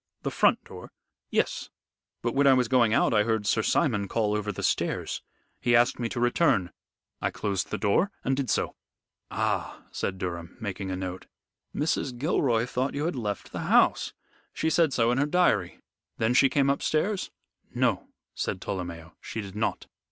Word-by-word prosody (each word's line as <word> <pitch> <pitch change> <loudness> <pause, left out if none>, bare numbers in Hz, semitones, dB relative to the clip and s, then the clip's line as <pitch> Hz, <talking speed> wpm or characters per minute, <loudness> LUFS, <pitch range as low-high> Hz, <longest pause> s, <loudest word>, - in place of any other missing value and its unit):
"The - - -1
front - - +3
door?" - - -11 0.4
"Yes. - - 0 0.5
But 120 -1 0
when 140 +1 +3
I 135 - +7
was 125 -2 +2
going 120 -3 +4
out 115 - +3
I 105 - +5
heard 110 -1 0
Sir 110 - +2
Simon 110 -6 +1
call 105 0 0
over 105 0 -1
the 95 - -6
stairs. - - -1 0.4
He 120 -1 +3
asked 120 +1 +3
me 120 -1 -1
to 120 - -4
return. 120 - +2 0.5
I - - +1
closed 100 -3 -2
the - - -2
door 110 - +2
and 135 - +1
did 135 -2 -2
so." - - 0 0.6
"Ah!" - - -2
said 95 - -3
Durham, 85 -2 -5
making 100 -2 -4
a 95 - -2
note. 95 0 -5 0.5
"Mrs. 145 -4 -1
Gilroy 120 -5 +1
thought 125 +2 -2
you 145 +2 -1
had 170 - -1
left 105 -5 -4
the - - -5
house. - - +4 0.4
She 160 - 0
said 165 -2 +3
so 120 -2 +2
in 125 - +1
her 145 - +2
diary. 180 +3 +2 0.4
Then 110 +2 +1
she 135 +2 +5
came 140 0 +3
upstairs?" 185 +8 0 0.5
"No," - - +1 0.3
said 95 - -3
Tolomeo, 85 -3 -5
"she - - -6
did 100 -2 -6
not. 110 - -1
115 Hz, 180 wpm, -27 LUFS, 100-135 Hz, 0.6 s, I